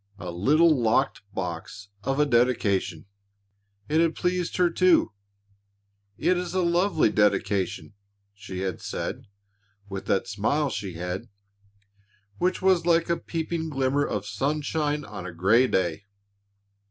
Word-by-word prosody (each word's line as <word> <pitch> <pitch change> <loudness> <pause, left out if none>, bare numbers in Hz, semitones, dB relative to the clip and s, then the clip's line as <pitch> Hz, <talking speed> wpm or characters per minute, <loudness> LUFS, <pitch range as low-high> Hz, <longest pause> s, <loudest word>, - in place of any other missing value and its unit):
A 90 - -6
little, 150 - +4
locked 115 +4 +1
box 95 +1 -6
of 135 +4 -1
a 150 - +5
dedication. 115 - +1 0.8
It 155 +2 +2
had 165 -1 +1
pleased 180 -1 -1
her, 175 -1 +3
too. 185 0 +4 1.1
"It 185 - +2
is 180 0 -4
a 185 - +2
lovely 170 - +2
dedication," 100 -2 0 0.4
she 95 -2 -7
had 95 -3 -3
said - - -5 0.6
with 95 -1 -6
that 95 - +1
smile 135 +8 0
she 100 -3 -4
had, 90 +2 -5 1.1
which 180 +1 0
was 185 -3 +3
like 170 0 +3
a - - +3
peeping 165 0 -3
glimmer 135 0 +1
of 105 -7 -3
sunshine 150 +6 -1
on 100 -4 -7
a - - -6
grey 100 +9 +3
day. 90 -2 -1
130 Hz, 130 wpm, -26 LUFS, 100-165 Hz, 1.1 s, a